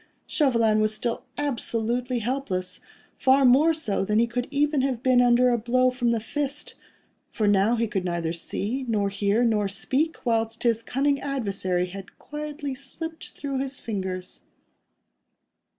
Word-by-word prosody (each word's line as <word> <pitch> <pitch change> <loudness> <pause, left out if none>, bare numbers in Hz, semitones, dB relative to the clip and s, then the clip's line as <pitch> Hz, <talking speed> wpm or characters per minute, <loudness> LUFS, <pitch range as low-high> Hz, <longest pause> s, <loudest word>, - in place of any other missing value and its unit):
Chauvelin 230 -7 +2
was 215 0 +1
still 230 +2 -3
absolutely 245 -3 -1
helpless, 230 -6 -3 0.4
far 265 +1 +4
more 275 +6 +6
so 220 -12 -1
than 210 +2 0
he 230 - +5
could 245 +1 -3
even 290 0 +1
have 260 -2 -1
been 255 -1 +5
under 245 +1 +5
a 240 -1 +2
blow 255 +3 +2
from 245 -1 0
the 230 -1 +1
fist, 285 +5 -3 0.6
for 215 - -1
now 205 +3 +4
he 230 0 +1
could 195 -3 -2
neither 170 -2 -2
see, 215 +9 -3
nor 205 -3 +1
hear, 200 +3 +1
nor 215 -3 +2
speak, 265 - -1
whilst 225 -1 0
his 230 -2 +2
cunning 275 +4 0
adversary 200 -9 -1
had 190 +1 -10
quietly 295 -1 -5
slipped 320 +5 -7
through 275 -2 -3
his 270 0 -4
fingers. 190 -4 -4
240 Hz, 150 wpm, -25 LUFS, 210-270 Hz, 0.6 s, more